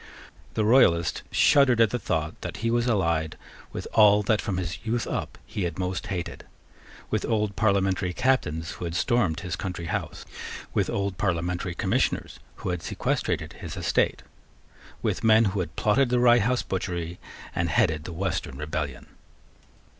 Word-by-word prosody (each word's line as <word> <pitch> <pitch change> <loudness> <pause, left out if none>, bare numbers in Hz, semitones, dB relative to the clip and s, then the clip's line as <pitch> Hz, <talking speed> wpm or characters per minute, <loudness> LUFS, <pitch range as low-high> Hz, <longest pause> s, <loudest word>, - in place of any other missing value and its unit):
The 110 - +1
Royalist 85 - +4
shuddered 135 -5 +5
at 115 -2 +5
the 125 - -1
thought 80 -6 -2
that - - -5
he 115 - +2
was 120 +1 +1
allied 85 -8 +1 0.3
with - - -5
all 105 -1 +6
that 105 +1 +2
from 100 -5 -2
his 90 0 -4
youth 115 +1 -1
up - - -4
he 105 - -5
had 85 -3 -4
most 95 +2 -3
hated, 90 -4 -4 0.7
with - - 0
old 105 -3 0
parliamentary 95 -3 +1
Captains 90 - 0
who 90 - -6
had 85 0 -4
stormed 95 -7 +1
his 90 -1 -3
country 90 -3 -5
house, 90 -2 -4 0.5
with - - +1
old 100 -2 -2
parliamentary 90 -1 -1
Commissioners - - 0 0.2
who - - -5
had 90 -2 -2
sequestrated - - -2
his - - -8
estate, - - +1 0.8
with - - -1
men 110 0 +6
who 100 0 0
had 85 -3 -4
plotted 125 +5 +3
the 125 - +2
Rye 120 0 +6
House 125 +3 +1
butchery 90 -2 -3 0.3
and - - 0
headed 75 -1 +1
the 85 - -6
Western 85 -6 -3
rebellion. 75 -2 -4
95 Hz, 160 wpm, -26 LUFS, 85-110 Hz, 0.8 s, all